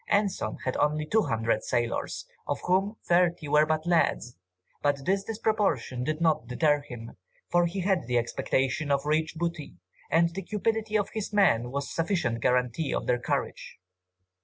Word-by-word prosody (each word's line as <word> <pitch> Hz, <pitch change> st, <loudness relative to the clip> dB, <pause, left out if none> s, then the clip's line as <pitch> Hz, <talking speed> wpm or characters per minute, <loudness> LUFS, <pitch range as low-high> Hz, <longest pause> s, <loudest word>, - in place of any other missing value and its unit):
Anson 200 Hz, -, 0 dB
had 130 Hz, -, -1 dB
only 150 Hz, +1 st, +1 dB
200 115 Hz, -, +1 dB
sailors, 120 Hz, -1 st, -2 dB, 0.2 s
of -, -, -1 dB
whom 195 Hz, +4 st, +1 dB
thirty 175 Hz, -2 st, +2 dB
were 150 Hz, +1 st, +4 dB
but 155 Hz, +1 st, 0 dB
lads, 160 Hz, -8 st, +1 dB, 0.5 s
but 145 Hz, -2 st, 0 dB
this 195 Hz, +3 st, +1 dB
disproportion 205 Hz, -, -1 dB
did 155 Hz, +3 st, -2 dB
not 155 Hz, -7 st, +1 dB
deter 145 Hz, +4 st, +2 dB
him, 120 Hz, -6 st, -10 dB, 0.3 s
for 175 Hz, 0 st, +4 dB
he 190 Hz, +3 st, -3 dB
had 185 Hz, -, 0 dB
the 125 Hz, -1 st, +1 dB
expectation 130 Hz, +4 st, 0 dB
of 140 Hz, 0 st, +1 dB
rich 155 Hz, +2 st, 0 dB
booty, 170 Hz, -, -4 dB, 0.3 s
and 170 Hz, +2 st, +3 dB
the 195 Hz, -, -4 dB
cupidity 215 Hz, +2 st, -1 dB
of 205 Hz, -, -2 dB
his 215 Hz, -1 st, -3 dB
men 125 Hz, -, +3 dB
was 140 Hz, +2 st, -3 dB
sufficient 165 Hz, -, 0 dB
guarantee 125 Hz, +5 st, +1 dB
of -, -, -2 dB
their 120 Hz, 0 st, +1 dB
courage. -, -, -3 dB
155 Hz, 160 wpm, -28 LUFS, 130-185 Hz, 0.5 s, were